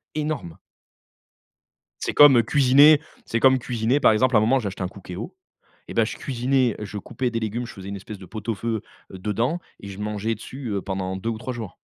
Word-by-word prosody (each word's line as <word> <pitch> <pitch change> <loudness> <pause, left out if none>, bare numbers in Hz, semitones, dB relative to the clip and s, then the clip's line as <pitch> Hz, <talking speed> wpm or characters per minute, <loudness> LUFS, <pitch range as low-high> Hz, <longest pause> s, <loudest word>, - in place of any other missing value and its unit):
énorme. 150 - -3 1.4
C'est - - -2
comme, 145 -4 +8
heu, 115 - +5
cuisiner. 145 +4 +6 0.2
C'est 115 - -1
comme 130 0 +5
cuisiner, 120 +2 0
par - - +5
exemple 120 +3 +2
à 105 - +7
un - - +1
moment 130 +5 +3
j'ai 105 - -3
acheté 95 0 -5
un 90 - -1
Cookéo 95 - -8 0.5
et - - -7
bah - - +3
je - - -4
cuisinais, 130 -2 0
je 105 0 -6
coupais 125 +5 -3
des 115 - -1
légumes, 115 +2 -3
je - - -10
faisais 95 0 -9
une 100 - -5
espèce 100 +2 -8
de 95 - -11
pot-au-feu, 110 +2 -3 0.3
heu, 95 - -7
dedans 115 - -1 0.2
et 100 - -10
je 100 0 -8
mangeais 105 +1 -2
dessus, 125 +3 -8
heu, 100 -2 -1
pendant 95 -1 -3
2 115 +4 -3
ou 110 - -3
3 125 +2 -5
jours. 110 -6 -7
115 Hz, 215 wpm, -24 LUFS, 100-130 Hz, 1.4 s, comme